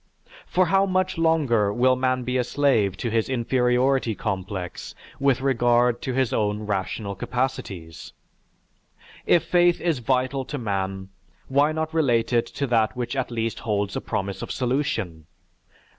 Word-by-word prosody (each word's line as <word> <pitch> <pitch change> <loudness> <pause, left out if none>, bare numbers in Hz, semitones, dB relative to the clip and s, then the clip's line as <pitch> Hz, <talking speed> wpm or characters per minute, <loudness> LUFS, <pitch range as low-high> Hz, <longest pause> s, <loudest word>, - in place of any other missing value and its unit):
For 185 +1 +2
how 195 +2 +3
much 185 -2 0
longer 140 -11 +2
will 130 +4 +3
man 130 0 0
be 125 +1 -2
a - - +2
slave 120 -8 +1
to 120 - -3
his 115 +1 0
inferiority 125 -1 +1
complex 95 -3 -5 0.2
with 135 -2 +2
regard 120 -2 +2
to 130 - -3
his 130 -1 0
own 105 -1 0
rational 100 0 -3
capacities? 100 -7 -4 1.2
If 170 - +4
faith 175 -1 +3
is 165 -6 0
vital 130 +2 0
to 145 - -5
man, 95 -4 -3 0.4
why 140 +3 +3
not 160 0 -3
relate 120 -7 +1
it 120 -1 +2
to 140 - -3
that 115 -3 +1
which 125 +1 -3
at 130 -2 -1
least 115 -1 -2
holds 100 -3 -2
a - - -2
promise 100 0 -3
of - - -5
solution? 120 - -2
125 Hz, 150 wpm, -24 LUFS, 105-135 Hz, 1.2 s, If